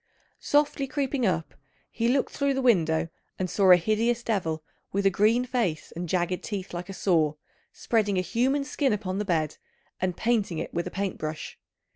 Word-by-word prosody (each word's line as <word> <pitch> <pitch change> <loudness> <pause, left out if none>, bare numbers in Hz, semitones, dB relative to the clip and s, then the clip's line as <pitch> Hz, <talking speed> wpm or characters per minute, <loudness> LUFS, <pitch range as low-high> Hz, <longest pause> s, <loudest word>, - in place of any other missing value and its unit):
Softly 290 -1 +1
creeping 270 -3 0
up, 165 -3 -1 0.4
he 230 0 0
looked 265 +3 +1
through 280 -1 +1
the 270 - 0
window 165 -9 +3 0.3
and 185 - -1
saw 190 +1 +2
a 180 - +11
hideous 225 +6 +1
devil, 165 -9 -1 0.3
with 200 0 -1
a 195 - +5
green 220 +6 +3
face 205 - -1
and 175 0 -4
jagged 180 0 0
teeth 195 -5 -5
like 175 +2 -5
a - - -5
saw, 160 -6 +2 0.4
spreading 210 -4 0
a - - +3
human 260 +9 +1
skin 275 -3 0
upon 195 -2 -2
the 210 - -1
bed 160 -5 0 0.4
and 180 -1 -1
painting 220 -7 +1
it - - -4
with 170 - -1
a - - -3
paint 195 -1 -3
brush. 155 0 -5
200 Hz, 185 wpm, -27 LUFS, 175-240 Hz, 0.4 s, a